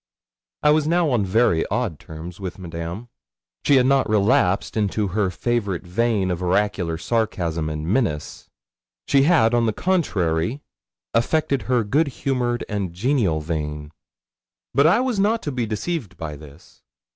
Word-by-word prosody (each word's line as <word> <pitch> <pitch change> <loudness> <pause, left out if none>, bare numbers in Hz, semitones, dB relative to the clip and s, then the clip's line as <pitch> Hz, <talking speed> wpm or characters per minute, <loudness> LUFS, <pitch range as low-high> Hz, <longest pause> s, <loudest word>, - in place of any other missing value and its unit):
I 150 - +6
was 155 0 +2
now 170 -2 +2
on 120 -5 +2
very 95 -4 +2
odd 110 - -2
terms 80 +5 -9
with 90 -2 -6
Madame. 85 +5 -6 0.5
She 145 - +4
had 130 -1 +5
not 135 -2 +3
relapsed 100 -2 +2
into 105 -1 0
her 100 +1 0
favourite 100 0 -2
vein 100 0 0
of 90 0 -3
oracular 90 -2 0
sarcasm 85 -6 -1
and 75 0 -4
menace; 85 - -2 0.6
she 140 - +4
had, 120 -10 +4
on 120 -1 +3
the 110 - +1
contrary, 105 - 0 0.5
affected 140 +3 +1
her 125 -3 +3
good 145 +10 +2
humoured 125 -3 -1
and 100 -4 -3
genial 100 - +1
vein. 75 -2 -4 0.8
But 140 +2 +5
I 200 +9 +4
was 255 -5 -1
not 220 +3 +2
to 145 - -2
be 125 -3 -2
deceived 110 - -3
by 75 -2 -5
this. 75 +2 -15
105 Hz, 150 wpm, -22 LUFS, 85-130 Hz, 0.8 s, I